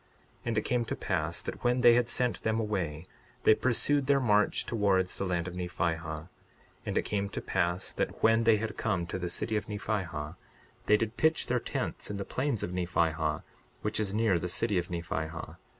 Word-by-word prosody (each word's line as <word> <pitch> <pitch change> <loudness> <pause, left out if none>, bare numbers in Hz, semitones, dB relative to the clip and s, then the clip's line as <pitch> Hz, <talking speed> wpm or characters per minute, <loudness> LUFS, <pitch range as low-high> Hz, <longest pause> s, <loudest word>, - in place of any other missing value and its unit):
62:18 - - -34 0.4
And 115 -2 -1
it - - +4
came 120 -1 0
to - - -3
pass 85 -3 -1
that - - -6
when 125 +1 +2
they 120 -1 +8
had 120 0 +2
sent 125 -2 0
them 110 0 +1
away 90 -8 -2 0.4
they - - +7
pursued 130 +4 +2
their 140 -1 +5
march 105 -5 +3
towards 100 -5 +1
the 100 - -2
land 90 -1 -1
of 90 - -5
Nephihah. 85 -3 -2 0.6
And - - -1
it - - +2
came 100 -1 -1
to - - -4
pass 85 +2 -1
that - - -3
when 115 +1 +5
they 115 -1 +5
had 110 +1 -4
come 100 -6 0
to 85 - -4
the 90 -1 -2
city 110 +5 -1
of 105 - -4
Nephihah, 90 -7 -3 0.5
they 105 - +6
did 110 +1 -3
pitch 160 0 +3
their - - +1
tents - - -3
in 105 - -3
the 100 - -4
plains 130 -4 -1
of - - -3
Nephihah, 80 -3 0 0.4
which 105 0 -1
is 105 -3 0
near 105 -4 +2
the 90 - -3
city 105 0 +1
of 90 +2 -4
Nephihah. 80 -2 -4
100 Hz, 205 wpm, -30 LUFS, 85-115 Hz, 0.6 s, they